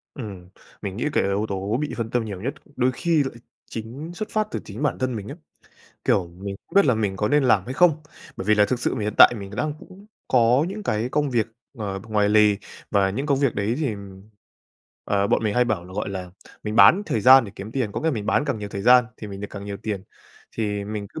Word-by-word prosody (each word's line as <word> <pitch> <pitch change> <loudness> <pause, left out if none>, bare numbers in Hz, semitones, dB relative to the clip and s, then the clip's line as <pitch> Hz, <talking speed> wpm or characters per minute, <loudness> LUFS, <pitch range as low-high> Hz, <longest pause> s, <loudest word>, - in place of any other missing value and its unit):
Ừm. 100 -9 -8 0.3
Mình 100 -1 -5
nghĩ 120 - -2
cái - - +2
yếu 100 +2 0
tố 100 +3 -1
bị 150 - -3
phân 115 -1 -3
tâm 120 -2 0
nhiều 100 -4 -6
nhất, 135 +7 -2
đ - - -24
đôi 130 0 +2
khi 155 +4 +1
lại 135 - -5 0.4
chính 120 +9 -6
xuất 210 +5 -5
phát 215 -1 0
từ - - -2
chính - - -6
bản 145 - 0
thân 130 -2 -1
mình 105 -1 -6
ấy. 155 - -8 0.7
Kiểu, 90 - +2
mình 100 +3 -7
không - - -17
biết 200 - +6
là 125 - +4
mình 105 -3 -1
có 105 +2 0
nên 145 0 +3
làm 110 -7 +4
hay 130 - -5
không, 175 -1 +5 0.4
bởi - - -5
vì 110 +2 +4
là 105 - +5
thực 125 +1 -1
sự - - 0
mình 110 -5 -3
hiện 105 - -2
tại 120 - +9
mình 100 -1 -8
đang 155 +4 -1
cũng 195 +2 -15 0.2
có 125 +3 +4
những 210 +2 -6
cái 110 - -1
công 145 +1 0
việc, 120 -3 +1 0.3
ờ, 100 -2 -4
ngoài 105 -1 +2
lề. 105 -1 +5 0.3
Và 100 -1 +3
những 135 +9 -3
công 140 -2 +2
việc 140 -4 +1
đấy 105 +3 0
thì, 140 -8 -1 1.1
ờ, 100 0 +1
bọn - - +1
mình 105 -1 0
hay 125 - +4
bảo 105 -7 -1
là, 90 - -12
gọi 105 +2 -3
là, 95 -2 -6 0.3
mình 105 0 -3
bán 195 +5 +7
thời 110 - 0
gian 130 +2 +8
để 100 - -9
kiếm 105 +3 -8
tiền, 120 -6 -1
có - - -3
nghĩa - - -8
là - - +4
mình 105 -2 -4
bán - - +2
càng 140 -6 -2
nhiều 105 -1 -5
thời 100 -1 -5
gian 125 +1 +7
thì 105 - -8
mình 100 -1 -8
được 105 - -5
càng 100 -1 -7
nhiều 100 -1 -5
tiền. 105 -3 -3 0.5
Thì 105 -2 -2
mình 105 -1 -5
cứ 155 - -8
110 Hz, 265 wpm, -23 LUFS, 100-130 Hz, 1.1 s, tại